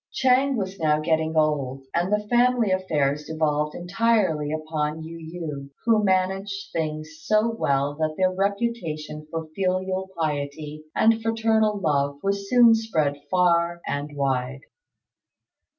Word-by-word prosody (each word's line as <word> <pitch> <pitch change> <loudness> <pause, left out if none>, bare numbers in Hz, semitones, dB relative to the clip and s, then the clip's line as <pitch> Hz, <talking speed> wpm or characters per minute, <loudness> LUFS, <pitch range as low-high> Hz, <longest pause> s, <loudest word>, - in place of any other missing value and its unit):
Ch'êng 265 +1 +3
was 195 -3 -4
now 150 -2 +2
getting 160 0 0
old, 140 -4 0
and 175 +3 0
the 210 0 0
family 240 -2 +3
affairs 150 -6 0
devolved 150 -1 -1
entirely 180 -5 +1
upon 155 0 -3
Yu 165 +1 -8
yü, 160 -4 -6 0.2
who 220 -2 +4
managed 195 +1 0
things 155 -1 -4
so 215 +1 +2
well 140 -10 0
that 155 +1 -2
their 185 0 +2
reputation 190 -7 -2
for 165 0 -4
filial 185 0 -1
piety 150 0 -3
and 225 0 +3
fraternal 220 -1 +1
love 145 -4 0
was 200 0 -1
soon 240 -2 +7
spread 155 -11 0
far 170 -2 +2
and 145 +1 -4
wide. 135 -1 -1
165 Hz, 130 wpm, -24 LUFS, 150-200 Hz, 0.2 s, soon